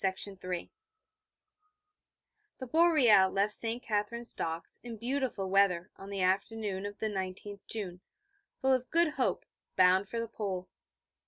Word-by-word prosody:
The 190 Hz, -2 st, -2 dB, 2.0 s
Boreal 255 Hz, -, +5 dB
left 200 Hz, +2 st, +1 dB
St. 230 Hz, +2 st, -1 dB
Katherine's 230 Hz, +3 st, -1 dB
Docks 165 Hz, 0 st, -4 dB
in 235 Hz, -2 st, -7 dB
beautiful 250 Hz, -4 st, -2 dB
weather 185 Hz, -2 st, +2 dB
on 195 Hz, -, -11 dB
the 200 Hz, -1 st, -3 dB
afternoon 195 Hz, +1 st, -1 dB
of 205 Hz, 0 st, -9 dB
the -, -, -3 dB
19th 200 Hz, 0 st, -4 dB
June, 185 Hz, -5 st, -4 dB, 0.6 s
full 265 Hz, 0 st, +2 dB
of 255 Hz, -1 st, -1 dB
good 335 Hz, -1 st, +4 dB
hope, 300 Hz, -, -1 dB, 0.3 s
bound 185 Hz, +2 st, +4 dB
for 230 Hz, -, -3 dB
the 230 Hz, -, -2 dB
Pole. 195 Hz, -5 st, -4 dB
205 Hz, 130 wpm, -31 LUFS, 190-235 Hz, 2.0 s, Boreal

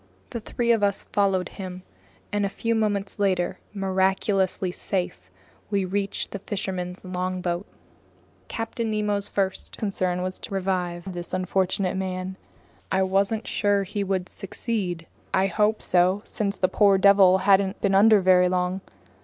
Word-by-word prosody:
The 235 Hz, -, -3 dB
three 235 Hz, +2 st, 0 dB
of 225 Hz, -2 st, +3 dB
us 200 Hz, -1 st, +1 dB
followed 195 Hz, -3 st, +2 dB
him, 185 Hz, -1 st, -8 dB, 0.5 s
and 205 Hz, 0 st, +1 dB
a 200 Hz, -, +1 dB
few 230 Hz, +3 st, -1 dB
moments 205 Hz, -3 st, -1 dB
later, 185 Hz, -3 st, +1 dB
miraculously 190 Hz, -1 st, +1 dB
safe, 180 Hz, -, -3 dB, 0.4 s
we 200 Hz, -2 st, +1 dB
reached 195 Hz, +1 st, -2 dB
the 200 Hz, -, -5 dB
fisherman's 185 Hz, -3 st, -4 dB
longboat. 180 Hz, 0 st, -2 dB, 0.8 s
Captain 225 Hz, 0 st, -3 dB
Nemo's 210 Hz, -1 st, 0 dB
first 190 Hz, -1 st, -2 dB
concern 185 Hz, -4 st, -1 dB
was 185 Hz, 0 st, -4 dB
to 195 Hz, -, -6 dB
revive 180 Hz, -1 st, -2 dB
this 175 Hz, +1 st, -4 dB
unfortunate 185 Hz, +1 st, 0 dB
man. 185 Hz, 0 st, -3 dB, 0.6 s
I 190 Hz, 0 st, +3 dB
wasn't 195 Hz, +4 st, +1 dB
sure 205 Hz, -1 st, +1 dB
he 205 Hz, +2 st, -3 dB
would 190 Hz, -2 st, -1 dB
succeed. 190 Hz, -4 st, -3 dB, 0.3 s
I 190 Hz, -, +3 dB
hoped 210 Hz, +3 st, +1 dB
so, 185 Hz, +3 st, +3 dB
since 200 Hz, -2 st, -2 dB
the 185 Hz, -, +2 dB
poor 200 Hz, +1 st, +4 dB
devil 195 Hz, -1 st, +6 dB
hadn't 195 Hz, 0 st, +3 dB
been 200 Hz, -1 st, +1 dB
under 210 Hz, +1 st, +6 dB
very 180 Hz, -1 st, +5 dB
long. 180 Hz, +1 st, 0 dB
190 Hz, 145 wpm, -25 LUFS, 185-205 Hz, 0.8 s, devil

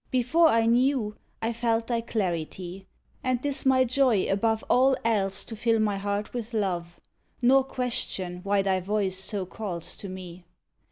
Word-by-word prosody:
Before 260 Hz, +7 st, +4 dB
I 230 Hz, -6 st, +3 dB
knew, 240 Hz, -2 st, +2 dB, 0.3 s
I 230 Hz, +1 st, 0 dB
felt 230 Hz, -1 st, 0 dB
thy 235 Hz, -1 st, -1 dB
clarity; 185 Hz, -3 st, -3 dB, 0.4 s
And 255 Hz, -1 st, +1 dB
'tis 285 Hz, -1 st, 0 dB
my 260 Hz, -1 st, +5 dB
joy 255 Hz, -5 st, +2 dB
above 220 Hz, +3 st, +1 dB
All 260 Hz, +1 st, +4 dB
else 195 Hz, -4 st, +1 dB
to 225 Hz, -, -7 dB
fill 225 Hz, +1 st, +2 dB
my 210 Hz, -2 st, +1 dB
heart 205 Hz, +1 st, -3 dB
with 235 Hz, -1 st, -5 dB
love 175 Hz, -5 st, -2 dB, 0.4 s
Nor 265 Hz, +2 st, +5 dB
question 235 Hz, -9 st, -2 dB
why 200 Hz, +1 st, +1 dB
thy 190 Hz, -1 st, +1 dB
voice 190 Hz, 0 st, -1 dB
so 195 Hz, 0 st, -3 dB
calls 180 Hz, -4 st, -5 dB
to 200 Hz, -, -7 dB
me. 185 Hz, -1 st, -9 dB
220 Hz, 160 wpm, -27 LUFS, 190-245 Hz, 0.4 s, my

